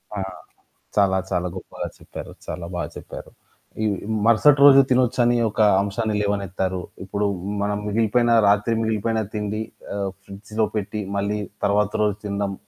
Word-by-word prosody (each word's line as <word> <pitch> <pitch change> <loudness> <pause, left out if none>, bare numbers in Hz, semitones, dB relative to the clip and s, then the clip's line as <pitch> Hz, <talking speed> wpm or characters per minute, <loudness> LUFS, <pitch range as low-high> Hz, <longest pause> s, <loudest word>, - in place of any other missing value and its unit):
ఆ! - - -3 0.8
చాలా 95 -2 +3
చాలా 90 +1 0
గొప్పగా 95 - -6
చెప్పారు. - - -9
చాలా 85 -1 -5
బా 90 - -2 0.2
చెప్పారు. - - -9 0.5
ఈ - - +2 0.4
మరుసటి 135 +5 +5
రోజు 135 -1 +9
తినొచ్చని 125 -1 +3
ఒక 105 - -8 0.2
అంశాన్ని 105 +2 -1
లేవనెత్తారు. 95 -2 -1 0.2
ఇప్పుడు 100 +2 -2 0.4
మనం 105 0 0
మిగిలిపోయినా 115 +2 +2
రాత్రి 105 +3 +3
మిగిలిపోయినా 110 0 0
తిండి 105 +1 -2 0.3
ఆ! - - -3 0.3
ఫ్రిడ్జ్‌లో 105 +2 -3
పెట్టి 105 +1 -2 0.2
మళ్ళీ 105 +1 -1 0.3
తర్వాత 105 0 +2
రోజు 105 -2 +1
తినడం, 100 -1 -2
105 Hz, 135 wpm, -23 LUFS, 100-110 Hz, 0.8 s, రోజు